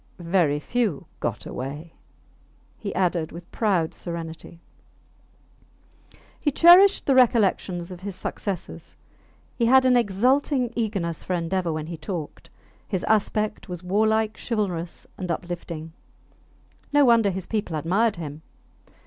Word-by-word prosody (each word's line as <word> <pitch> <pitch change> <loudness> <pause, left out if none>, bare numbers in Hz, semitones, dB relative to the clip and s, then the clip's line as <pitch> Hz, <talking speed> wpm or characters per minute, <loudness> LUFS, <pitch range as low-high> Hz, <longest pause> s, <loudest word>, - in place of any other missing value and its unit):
Very 170 -4 +1
few 215 - -1
got - - -3
away, 145 +6 -6 0.9
he 200 - -4
added, 175 -3 0
with 170 +1 -11
proud 185 -8 +1
serenity. 165 -1 -7 1.8
He 295 - +1
cherished 360 +7 +7
the 275 - +3
recollections 200 -8 +2
of 180 - -8
his 195 0 -6
successes; 190 -1 -6 0.6
he 235 - +1
had 260 +1 +6
an 255 -1 +5
exulting 245 +4 +2
eagerness 195 -8 -2
for 185 - -1
endeavour; 175 +1 -1
when 155 -1 -3
he 165 +1 -6
talked, 170 -4 -6 0.4
his 190 -3 -2
aspect 215 -1 0
was 180 -1 -6
warlike, 220 +3 +1
chivalrous, 185 -7 -3
and 180 - -4
uplifting. 170 -2 -5 1.0
No 290 -1 +5
wonder 230 -4 +5
his 190 -1 -4
people 210 -7 -2
admired 195 +8 +1
him. 155 -3 -7
190 Hz, 125 wpm, -24 LUFS, 170-225 Hz, 1.8 s, cherished